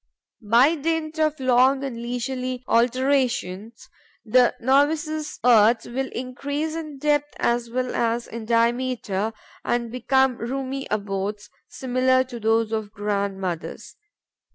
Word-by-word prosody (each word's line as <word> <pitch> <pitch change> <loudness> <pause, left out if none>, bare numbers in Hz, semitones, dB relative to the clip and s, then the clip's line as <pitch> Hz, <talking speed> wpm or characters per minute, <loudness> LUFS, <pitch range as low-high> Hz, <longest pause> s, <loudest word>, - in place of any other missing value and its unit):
By 235 +8 +4
dint 320 0 -2
of 310 -1 +1
long 260 +1 +3
and 270 -3 -4
leisurely 250 +1 -3
alterations, 240 -3 0 0.4
the 245 +2 +4
novice's 300 +4 +1
earths 230 -1 +5
will 265 +2 -3
increase 285 +5 -3
in 310 -3 -6
depth 290 +1 0
as 235 0 0
well 255 +1 -2
as 235 0 0
in 230 -1 -7
diameter 230 -3 0 0.3
and 235 -1 -1
become 260 +1 +2
roomy 270 +2 -4
abodes, 205 0 -3 0.2
similar 255 +1 +1
to 250 -2 -9
those 225 0 +1
of 220 -1 -1
the - - -19
grandmothers. 200 -4 -4
250 Hz, 120 wpm, -23 LUFS, 230-270 Hz, 0.4 s, earths